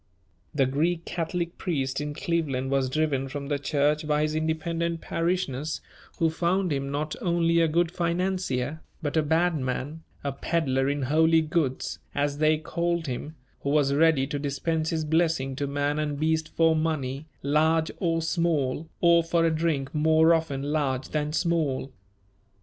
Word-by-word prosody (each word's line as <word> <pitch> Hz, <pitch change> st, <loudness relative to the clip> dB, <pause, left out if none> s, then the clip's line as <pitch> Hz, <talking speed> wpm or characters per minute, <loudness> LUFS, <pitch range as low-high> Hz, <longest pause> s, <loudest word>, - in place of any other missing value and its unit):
The 135 Hz, -2 st, +4 dB
Greek 160 Hz, +6 st, 0 dB
Catholic 170 Hz, 0 st, -3 dB
priest 135 Hz, -6 st, -1 dB
in 145 Hz, 0 st, -4 dB
Cleveland 140 Hz, -7 st, -1 dB
was 135 Hz, -1 st, +1 dB
driven 140 Hz, -2 st, 0 dB
from 140 Hz, +1 st, -6 dB
the 145 Hz, -1 st, 0 dB
church 150 Hz, +1 st, +1 dB
by 150 Hz, 0 st, +2 dB
his 155 Hz, 0 st, 0 dB
independent 165 Hz, +1 st, -1 dB
parishioners, 160 Hz, -5 st, -2 dB, 0.4 s
who 165 Hz, -1 st, +2 dB
found 175 Hz, +1 st, +1 dB
him 140 Hz, 0 st, -2 dB
not 150 Hz, +2 st, -2 dB
only 170 Hz, -1 st, +2 dB
a 165 Hz, -, +4 dB
good 170 Hz, +2 st, +1 dB
financier, 170 Hz, -5 st, -1 dB, 0.2 s
but 145 Hz, 0 st, -2 dB
a 160 Hz, -, +4 dB
bad 160 Hz, +2 st, +2 dB
man, 130 Hz, +4 st, -3 dB, 0.2 s
a 140 Hz, -, -1 dB
"peddler 135 Hz, -2 st, 0 dB
in 145 Hz, -1 st, -1 dB
holy 160 Hz, +4 st, +4 dB
goods," 155 Hz, -5 st, -1 dB, 0.2 s
as 145 Hz, 0 st, 0 dB
they 155 Hz, 0 st, +4 dB
called 170 Hz, +1 st, -1 dB
him, 145 Hz, +4 st, -5 dB, 0.2 s
who 140 Hz, -, -3 dB
was 140 Hz, -1 st, +3 dB
ready 155 Hz, -2 st, +4 dB
to 145 Hz, +1 st, -3 dB
dispense 155 Hz, +3 st, -1 dB
his 160 Hz, -1 st, -1 dB
blessing 160 Hz, -4 st, +1 dB
to 140 Hz, -1 st, -1 dB
man 145 Hz, +1 st, -1 dB
and 150 Hz, -2 st, -2 dB
beast 160 Hz, +1 st, +1 dB
for 165 Hz, -1 st, +3 dB
money, 155 Hz, -3 st, -2 dB, 0.2 s
large 160 Hz, +3 st, +2 dB
or 165 Hz, -2 st, 0 dB
small, 160 Hz, -3 st, 0 dB
or 170 Hz, -1 st, +6 dB
for 165 Hz, 0 st, +1 dB
a 165 Hz, -, +2 dB
drink 155 Hz, -4 st, -1 dB
more 160 Hz, +2 st, +4 dB
often 160 Hz, -4 st, -1 dB
large 140 Hz, -3 st, -1 dB
than 150 Hz, -1 st, -1 dB
small. 155 Hz, -6 st, 0 dB
155 Hz, 160 wpm, -26 LUFS, 140-165 Hz, 0.4 s, or